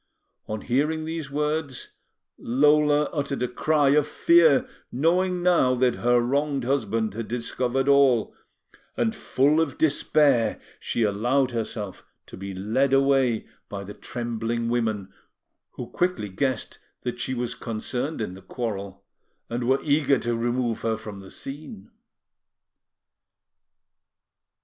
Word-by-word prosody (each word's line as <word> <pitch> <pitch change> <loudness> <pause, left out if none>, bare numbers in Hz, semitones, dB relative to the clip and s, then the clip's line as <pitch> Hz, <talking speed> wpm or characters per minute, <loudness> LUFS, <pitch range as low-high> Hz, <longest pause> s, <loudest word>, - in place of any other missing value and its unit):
On 110 -1 -4
hearing 150 +5 0
these 160 -3 -4
words, 150 -1 -2 0.5
Lola 150 +3 +3
uttered 140 -4 -2
a - - +1
cry 145 +3 +2
of 150 +1 +3
fear, 165 -3 +4 0.2
knowing 175 +6 +1
now 170 -8 +4
that 125 -1 +2
her 120 0 +3
wronged 140 +2 0
husband 115 -5 0
had 115 +1 -5
discovered 125 +2 -1
all; 140 -5 +4 0.6
and, 225 -1 +1
full 150 -3 +2
of 150 -5 -2
despair, 145 -5 +2 0.2
she 115 - -1
allowed 120 +6 +1
herself 110 -4 -4 0.2
to - - -11
be 95 +1 -6
led 110 +9 0
away 135 -4 +3 0.2
by 100 -1 -5
the 100 +1 -8
trembling 115 0 -3
women, 110 -5 -1 0.6
who - - -6
quickly 180 - -1
guessed 130 +4 -2 0.2
that 120 0 -4
she 130 +2 -2
was 120 0 -2
concerned 125 +4 -4
in 100 -4 -3
the 95 - -11
quarrel, 100 -5 -5 0.5
and 120 0 -2
were 135 +1 +2
eager 145 -2 +3
to 120 -1 -1
remove 120 0 -1
her 115 -1 0
from 105 -2 -8
the 95 -1 -12
scene. 135 -8 -8
125 Hz, 130 wpm, -25 LUFS, 115-145 Hz, 0.6 s, fear